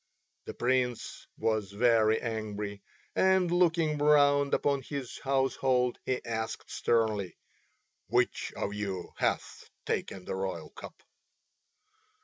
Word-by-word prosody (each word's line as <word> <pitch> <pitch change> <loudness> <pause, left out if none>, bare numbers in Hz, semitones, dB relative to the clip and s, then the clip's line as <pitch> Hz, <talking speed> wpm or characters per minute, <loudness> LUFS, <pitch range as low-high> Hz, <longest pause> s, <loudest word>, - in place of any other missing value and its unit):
The - - -7
Prince 125 -1 -1
was 110 -3 0
very 110 0 +4
angry, 105 -3 -4 0.3
and 190 -2 +3
looking 165 -4 +2
round 145 -1 +4
upon 140 -1 +1
his 135 -2 -6
household 130 -2 +1
he 130 -1 -1
asked 110 -1 -4
sternly, 110 -6 0 0.7
"Which - - +1
of 100 - -3
you 95 -3 -4
hath - - -2 0.2
taken 95 -2 -3
the - - -4
royal 95 0 -4
cup?" - - -11
120 Hz, 110 wpm, -30 LUFS, 105-140 Hz, 0.7 s, very